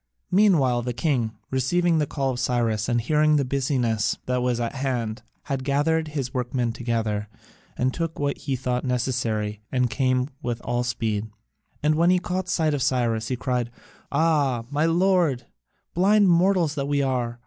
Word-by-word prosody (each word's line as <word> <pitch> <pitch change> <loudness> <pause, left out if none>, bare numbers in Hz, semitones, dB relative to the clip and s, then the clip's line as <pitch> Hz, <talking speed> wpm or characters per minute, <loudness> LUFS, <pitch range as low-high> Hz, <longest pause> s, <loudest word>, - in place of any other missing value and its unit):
Meanwhile 160 - +4
the 120 +1 -3
king, 120 -4 0 0.2
receiving 165 +6 +2
the 150 - 0
call 135 -2 -1
of 125 - -4
Cyrus, 115 -3 0
and 120 -1 +2
hearing 150 +5 +3
the 140 -2 +2
business 125 -5 0
that 125 0 0
was 125 -1 0
at 120 +2 -2
hand, 125 -4 -2 0.2
had 135 -2 -3
gathered 150 +4 +1
his 140 -4 -4
workmen 125 -1 -1
together 115 -3 -2 0.5
and 130 +1 +1
took 165 -1 -3
what 140 -1 -1
he 135 - -2
thought 125 -1 -2
necessary 115 -5 -1
and 125 -2 +1
came 130 -1 +1
with 120 -3 -3
all 120 0 -1
speed. 110 -3 -2 0.5
And 150 +1 +3
when 170 +3 +3
he 185 - +5
caught 180 0 -3
sight 160 -3 +1
of 145 - -1
Cyrus, 115 -4 0
he 130 - -1
cried: 125 -1 -1 0.4
"Ah, 145 -6 +1
my 150 +3 +2
lord, 170 -7 +2 0.5
blind 200 +2 +4
mortals 175 -2 +3
that 140 -2 -3
we 140 -1 +1
are! 120 -3 -1
130 Hz, 170 wpm, -24 LUFS, 120-155 Hz, 0.5 s, he